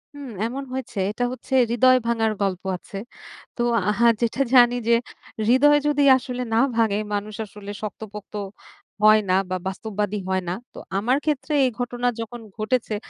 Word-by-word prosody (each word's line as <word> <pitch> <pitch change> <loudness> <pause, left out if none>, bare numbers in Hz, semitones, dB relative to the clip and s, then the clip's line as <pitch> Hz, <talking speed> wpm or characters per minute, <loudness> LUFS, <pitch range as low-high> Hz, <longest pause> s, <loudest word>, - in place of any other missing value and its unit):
হুম, 285 -2 -8 0.2
এমন 260 +4 -4
হয়েছে। 260 -4 -6
এটা 235 +3 -3
হচ্ছে 260 +1 -8 0.2
হৃদয় 255 +2 +5
ভাঙার 225 -2 +1
গল্প 190 -2 -1 0.2
আছে। 195 - -10 0.6
তো - - -1 0.3
আহা 230 +3 +3
যেটা 235 +3 0
জানি 245 -1 +7
যে 235 - +5 0.6
হৃদয় 290 +4 +6
যদি 290 -1 +2
আসলে 250 -1 -5
না - - +3 0.2
ভাঙে, 220 -3 +2 0.2
মানুষ 205 +1 -3
আসলে 205 0 -9
শক্তপোক্ত 210 -1 -8 0.7
হয়না 215 -3 +5 0.2
বা, 185 - -1
বাস্তববাদী 205 +1 -3
হয়না। 185 -2 -1 0.2
তো - - -13 0.2
আমার 240 +7 +2
ক্ষেত্রে 300 0 -1
এই - - +2
ঘটনা 245 0 -2
যখন 230 +1 -6 0.2
ঘটেছে, 220 0 -1
230 Hz, 150 wpm, -23 LUFS, 210-255 Hz, 0.7 s, জানি